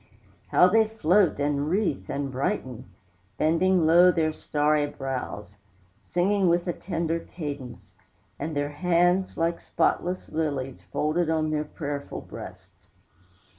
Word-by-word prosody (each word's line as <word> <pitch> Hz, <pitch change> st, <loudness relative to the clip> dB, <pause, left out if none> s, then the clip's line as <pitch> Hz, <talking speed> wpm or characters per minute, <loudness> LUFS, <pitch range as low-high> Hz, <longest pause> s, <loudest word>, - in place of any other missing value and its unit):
How 180 Hz, -, +5 dB
they 220 Hz, +3 st, +4 dB
float 195 Hz, -5 st, +2 dB
and 145 Hz, +1 st, 0 dB
wreathe 175 Hz, -, -1 dB
and 140 Hz, -1 st, -3 dB
brighten, 130 Hz, -, -3 dB, 0.5 s
Bending 170 Hz, +2 st, +3 dB
low 175 Hz, +3 st, +7 dB
their 160 Hz, -2 st, 0 dB
starry 150 Hz, 0 st, +1 dB
brows, 130 Hz, -8 st, -6 dB, 0.4 s
Singing 190 Hz, -, +1 dB
with 175 Hz, +1 st, +1 dB
a 175 Hz, -, 0 dB
tender 165 Hz, -2 st, -2 dB
cadence, 135 Hz, -, -8 dB, 0.5 s
And 155 Hz, +2 st, -4 dB
their 145 Hz, 0 st, -1 dB
hands, 180 Hz, +4 st, +1 dB
like 165 Hz, +1 st, 0 dB
spotless 180 Hz, +2 st, -1 dB
lilies, 140 Hz, -5 st, -3 dB
Folded 155 Hz, +2 st, 0 dB
on 155 Hz, -1 st, +1 dB
their 150 Hz, 0 st, -1 dB
prayerful 145 Hz, -2 st, -5 dB
breasts. -, -, -11 dB
160 Hz, 125 wpm, -26 LUFS, 145-175 Hz, 0.5 s, low